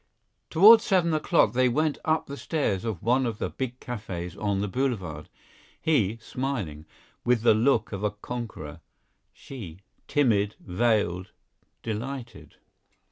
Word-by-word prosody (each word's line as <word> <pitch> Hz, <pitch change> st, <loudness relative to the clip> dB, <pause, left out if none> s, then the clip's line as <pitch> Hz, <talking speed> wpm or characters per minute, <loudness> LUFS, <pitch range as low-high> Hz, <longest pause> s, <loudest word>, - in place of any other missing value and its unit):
Toward 215 Hz, +7 st, +8 dB
seven 185 Hz, -7 st, +2 dB
o'clock 155 Hz, -, +3 dB
they 125 Hz, 0 st, +3 dB
went 155 Hz, +4 st, 0 dB
up 160 Hz, 0 st, +1 dB
the 140 Hz, -, -7 dB
stairs 135 Hz, -, -1 dB
of 110 Hz, -7 st, -4 dB
one 125 Hz, +2 st, +2 dB
of 110 Hz, -3 st, -3 dB
the -, -, -3 dB
big 130 Hz, -1 st, -5 dB
cafes 95 Hz, -8 st, -6 dB
on 100 Hz, -2 st, -1 dB
the 105 Hz, -, -1 dB
Boulevard, 95 Hz, -, -3 dB, 0.5 s
he, 115 Hz, -9 st, +1 dB
smiling, 110 Hz, -, -4 dB, 0.4 s
with 120 Hz, -2 st, +2 dB
the 120 Hz, -, +6 dB
look 115 Hz, +1 st, +2 dB
of 100 Hz, -1 st, -5 dB
a 105 Hz, -, +2 dB
conqueror, 105 Hz, -7 st, -7 dB, 0.5 s
she, 95 Hz, -10 st, -10 dB, 0.3 s
timid, 105 Hz, -8 st, +2 dB
veiled, 95 Hz, -3 st, 0 dB, 0.5 s
delighted. 115 Hz, -, -6 dB
115 Hz, 135 wpm, -26 LUFS, 100-135 Hz, 0.5 s, Toward